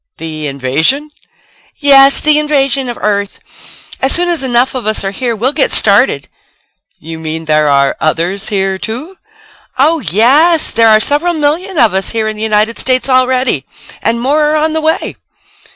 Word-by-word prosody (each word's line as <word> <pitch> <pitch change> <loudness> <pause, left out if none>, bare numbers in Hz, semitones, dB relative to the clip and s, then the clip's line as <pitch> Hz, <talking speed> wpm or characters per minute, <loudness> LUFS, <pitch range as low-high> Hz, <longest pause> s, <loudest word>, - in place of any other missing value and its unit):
"The 155 -1 -6
invasion?" 150 - -1 0.7
"Yes, 275 -1 +5
the 300 0 +3
invasion 275 -3 0
of 240 - -6
Earth. 200 -1 -2 0.6
As 265 - +1
soon 350 0 +1
as 340 -5 -1
enough 250 -1 +1
of 255 -4 -5
us 215 -1 -1
are 195 - -3
here 235 +3 -3
we'll 250 +6 -1
get - - 0
started." - - +2 0.7
"You 160 +1 -9
mean 160 0 -6
there 155 -1 +1
are 140 -1 +2
others 170 +5 -1
here, 195 -2 -2
too?" 250 - -6 0.6
"Oh, 310 +5 +2
yes, 270 - +3
there 225 0 +3
are 215 0 +5
several 300 +9 0
million 320 +5 -1
of 225 -7 +3
us 190 0 -2
here 225 -1 -2
in 215 - -4
the 210 - -9
United 220 +1 0
States 255 0 -1
already 255 - +1 0.4
and 230 +2 -1
more 280 +5 +1
are 300 +1 0
on 310 +1 0
the 320 - -1
way." 320 +2 -2
240 Hz, 170 wpm, -12 LUFS, 195-290 Hz, 0.7 s, Yes